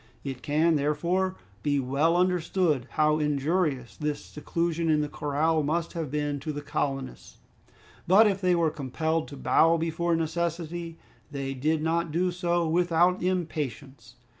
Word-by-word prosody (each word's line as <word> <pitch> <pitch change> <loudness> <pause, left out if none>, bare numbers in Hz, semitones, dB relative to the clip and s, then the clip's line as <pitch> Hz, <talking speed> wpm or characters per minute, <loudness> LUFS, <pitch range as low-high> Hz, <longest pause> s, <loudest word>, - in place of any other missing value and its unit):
It 135 -3 -5
can, 155 +2 +2
therefore, 170 +6 0 0.3
be 145 +3 +1
well 140 +6 +1
understood 175 -6 +1
how 155 0 +3
injurious 150 -2 0
this 150 -1 -3
seclusion 165 +2 -2
in 155 -1 +3
the 150 - -1
corral 155 +2 0
must 165 +3 -1
have 165 -5 -3
been 145 0 -2
to 155 +3 -4
the 145 0 -6
colonists. 140 -3 -4 0.7
But 195 +5 +7
if 200 -2 +1
they 180 -1 +3
were 165 -2 +2
compelled 160 +4 -2
to 140 - -9
bow 165 +4 +4
before 165 +1 0
necessity, 165 0 -3 0.3
they 140 -2 -4
did 155 +4 0
not 165 0 0
do 180 +3 +1
so 175 -1 0
without 175 +2 +2
impatience. 145 -9 -3
160 Hz, 145 wpm, -27 LUFS, 145-170 Hz, 0.7 s, But